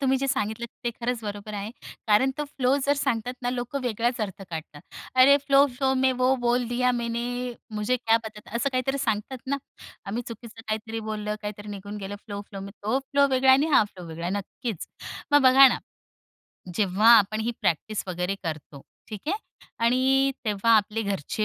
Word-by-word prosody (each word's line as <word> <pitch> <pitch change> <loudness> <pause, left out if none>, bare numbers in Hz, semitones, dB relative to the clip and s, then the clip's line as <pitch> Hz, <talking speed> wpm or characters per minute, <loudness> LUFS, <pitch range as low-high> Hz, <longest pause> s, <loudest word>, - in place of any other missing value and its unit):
तुम्ही 270 -1 +2
जे 275 - -1
सांगितल 235 -4 -1 0.2
ते 240 - +1
खरंच 240 0 -1
बरोबर 205 0 -6
आहे. 205 +1 -4 0.4
कारण 215 +5 +4
तो 295 - -1
फ्लो 270 -2 +1
जर 285 - +4
सांगतात 245 -2 -1
ना, 245 - 0
लोकं 250 +2 -3
वेगळाच 240 0 -1
अर्थ 195 -2 -4
काढतात. 160 -2 -7 0.3
"अरे 260 +2 +7
फ्लो-फ्लो 275 -1 +3
में 260 0 +4
वो 255 +1 +4
बोल 240 0 +2
दिया 250 +1 +2
मैने. 235 -1 -2 0.5
मुझे 210 +4 +1
क्या 225 -2 +3
पता 215 -1 -8
था?" 210 - -14
असं 280 - +1
काहीतरी 260 +2 0
सांगतात 225 +1 -2
ना, 280 +1 0 0.5
आम्ही 225 +5 -3
चुकीचं 230 0 -10
काहीतरी 220 +1 -3
बोललं 210 -1 -2
काहीतरी 210 0 -6
निघून 205 +1 -7
गेलं 200 0 -6
फ्लो-फ्लो 200 -1 -7
तो 215 +5 -1
फ्लो 280 +1 +2
वेगळा 265 0 +4
आहे 260 - +7
आणि 305 +2 0
हा - - +7
फ्लो 185 -4 -11
वेगळा 165 +1 -7
आहे 185 - -1
नक्कीच. 205 0 -5 0.5
मग 290 -1 +6
बघा 265 +1 +9
ना, - - -1 1.0
जेव्हा 205 +3 +4
आपण 215 +2 0
ही 225 +2 0
प्रॅक्टिस 200 +6 0
वगैरे 180 +2 -1
करतो 155 -4 -6 0.3
ठीक 210 -3 -6
आहे 400 - +1 0.5
आणि 265 +3 +3
तेव्हा 210 +1 +1
आपले 215 +1 0
घरचे 200 +1 -2
225 Hz, 180 wpm, -26 LUFS, 205-255 Hz, 1.0 s, बघा